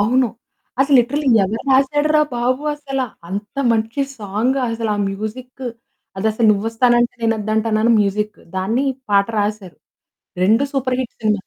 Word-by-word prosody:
అవును. 245 +4 +3 0.5
అసలు 275 +1 +3
లిట్రల్లీ 280 +4 -1 0.2
ఎవరు 215 +4 -3
రాశాడురా 290 +3 +3
బాబు 255 +3 0
అసల! 285 -2 -4 0.3
అంత 205 +3 -5 0.2
మంచి 225 +4 -1 0.2
సాంగసలా 230 +2 -1
ఆ - - +1
మ్యూజిక్కు, 250 +6 -6 0.5
అదసలు 220 +3 +1
'నువ్వొస్తానంటే 235 +3 +2
నేనొద్దంటానా' 220 0 0
అని 235 +1 +4
మ్యూజిక్కు, 210 +1 -1 0.2
దాన్ని 220 +8 0 0.3
పాట 200 -1 +4
రాశారు. 205 -3 -3 0.7
2 220 +8 +4
సూపర్ 260 -2 0
హిట్ 255 - -5
సినిమాలు. 210 -3 0
225 Hz, 125 wpm, -19 LUFS, 210-255 Hz, 0.7 s, అని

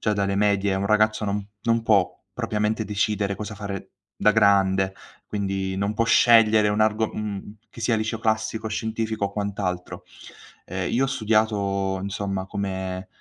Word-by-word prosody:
già 105 - +1
dalle 100 -1 0
medie 100 -1 +2
un 100 +1 -1
ragazzo 110 0 +2
non 100 0 -2 0.2
non 115 0 +1
può 100 -7 +3 0.2
propriamente 105 +1 -1
decidere 105 -1 -1
cosa 105 0 -6
fare 100 -2 -6 0.2
da 105 - +4
grande, 95 -2 +3 0.3
quindi 95 -2 -2
non 100 +2 -1
può 115 - +1
scegliere 110 -2 +5
un 105 +1 0
argo 110 0 +2
mhmm, 105 0 -5
che - - -12
sia 115 +1 +2
il 110 - 0
liceo 110 +1 -2
classico, 110 0 -1
scientifico 110 -1 -2
o 100 - -9
quant'altro. 100 -3 -3 0.6
Ehm, 90 0 -3
io 130 +3 +2
ho - - -3
studiato 105 -5 0
insomma 100 -1 -3
come, 95 -1 -4
105 Hz, 160 wpm, -24 LUFS, 100-110 Hz, 0.6 s, scegliere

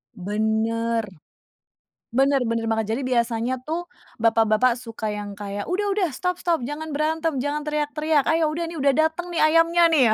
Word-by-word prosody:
Bener. 220 +3 0 1.1
Bener 270 +2 +2
bener 230 -1 -1
banget. 220 0 0
Jadi 270 - -3
biasanya 235 0 0
tuh 330 +5 -4 0.3
bapak-bapak 225 +1 +3
suka 225 -3 -5
yang 205 -1 -6
kayak, 205 - -5
"Udah 400 +2 0
udah, 380 -5 +1
stop 360 +7 -3
stop! 340 -2 +2
Jangan 305 +3 -5
berantem, 310 0 -1
jangan 290 +3 -1
teriak-teriak. 300 0 0
Ayo, 320 -1 +2
udah 335 +2 -2
nih 330 0 -7
udah 275 -1 +4
dateng 320 +3 +1
nih 340 - -1
ayamnya 330 +2 +4
nih 290 - +5
ya." - - +4
275 Hz, 165 wpm, -23 LUFS, 225-320 Hz, 1.1 s, nih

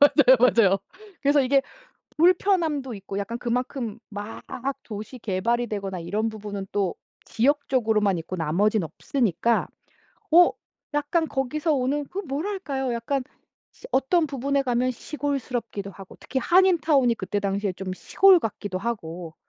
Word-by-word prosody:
맞아요, 285 -2 +7
맞아요. 225 -6 +5 0.4
그래서 285 0 +4
이게 270 +1 +3 0.5
불편함도 330 - +2
있고 195 0 -6
약간 230 +4 -4
그만큼 240 -2 -2
막 205 +2 -7 0.4
도시 215 +3 -8
개발이 230 +3 0
되거나 195 -3 -4
이런 205 +7 -1
부분은 205 -2 -6
또 195 -4 0 0.3
지역적으로만 225 - +1
있고 165 +3 -5
나머지는 185 +5 +1
없으니까 230 - 0 0.6
어 350 +2 +8 0.4
약간 300 +3 +1
거기서 295 +4 -1
오는 280 +2 0
그 370 - -7
뭐랄까요? 285 -5 -3
약간 245 +4 -1 0.5
시 - - -13
어떤 315 +5 +2
부분에 275 0 0
가면 250 0 +1
시골스럽기도 250 -6 -4
하고 195 -1 -13
특히 265 - -2
한인 365 +5 +4
타운이 275 -7 +3
그때 205 -1 -3
당시에 200 0 -1
좀 185 +1 -5
시골 385 - +5
같기도 205 - -4
하고 175 -6 -5
240 Hz, 320 characters per minute, -25 LUFS, 205-285 Hz, 0.6 s, 어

